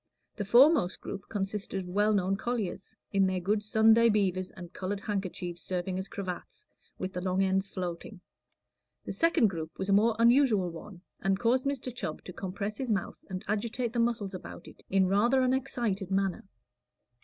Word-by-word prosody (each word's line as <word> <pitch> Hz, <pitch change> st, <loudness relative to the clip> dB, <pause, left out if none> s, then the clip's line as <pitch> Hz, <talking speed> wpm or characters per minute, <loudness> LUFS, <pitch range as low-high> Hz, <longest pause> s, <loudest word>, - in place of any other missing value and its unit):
The 205 Hz, -, -3 dB
foremost 250 Hz, -, +5 dB
group 200 Hz, -, -7 dB
consisted 195 Hz, -1 st, -3 dB
of -, -, -10 dB
well 205 Hz, +4 st, +2 dB
known 195 Hz, -2 st, +2 dB
colliers, 210 Hz, -2 st, -3 dB, 0.2 s
in 195 Hz, -1 st, +4 dB
their 185 Hz, -1 st, 0 dB
good 205 Hz, +4 st, 0 dB
Sunday 220 Hz, +2 st, +5 dB
beavers 185 Hz, -3 st, +1 dB
and 180 Hz, -1 st, -11 dB
colored 195 Hz, +1 st, -3 dB
handkerchiefs 185 Hz, -4 st, -4 dB
serving 185 Hz, +2 st, -2 dB
as 190 Hz, -, -5 dB
cravats, 195 Hz, -, -6 dB, 0.3 s
with 185 Hz, +1 st, -4 dB
the 180 Hz, -, -3 dB
long 185 Hz, +1 st, +1 dB
ends 190 Hz, +1 st, +1 dB
floating. 180 Hz, +2 st, -5 dB, 0.9 s
The -, -, -4 dB
second 330 Hz, -9 st, +3 dB
group 160 Hz, -2 st, -6 dB
was 190 Hz, -, -3 dB
a -, -, +4 dB
more 220 Hz, +3 st, +4 dB
unusual 230 Hz, -6 st, +4 dB
one, 175 Hz, +2 st, -10 dB, 0.2 s
and 195 Hz, 0 st, +1 dB
caused 255 Hz, +3 st, +2 dB
Mr. 260 Hz, -3 st, -3 dB
Chubb 155 Hz, -10 st, -5 dB
to 180 Hz, -, -9 dB
compress 200 Hz, +3 st, -4 dB
his 260 Hz, -2 st, -3 dB
mouth 200 Hz, -4 st, -2 dB
and 185 Hz, +2 st, -5 dB
agitate 230 Hz, +3 st, -1 dB
the 240 Hz, -, 0 dB
muscles 230 Hz, -4 st, 0 dB
about 185 Hz, -, -9 dB
it -, -, -14 dB
in 190 Hz, 0 st, +3 dB
rather 235 Hz, +8 st, +3 dB
an 255 Hz, 0 st, +2 dB
excited 235 Hz, -8 st, -1 dB
manner. 195 Hz, -1 st, 0 dB
200 Hz, 180 wpm, -30 LUFS, 185-230 Hz, 0.9 s, foremost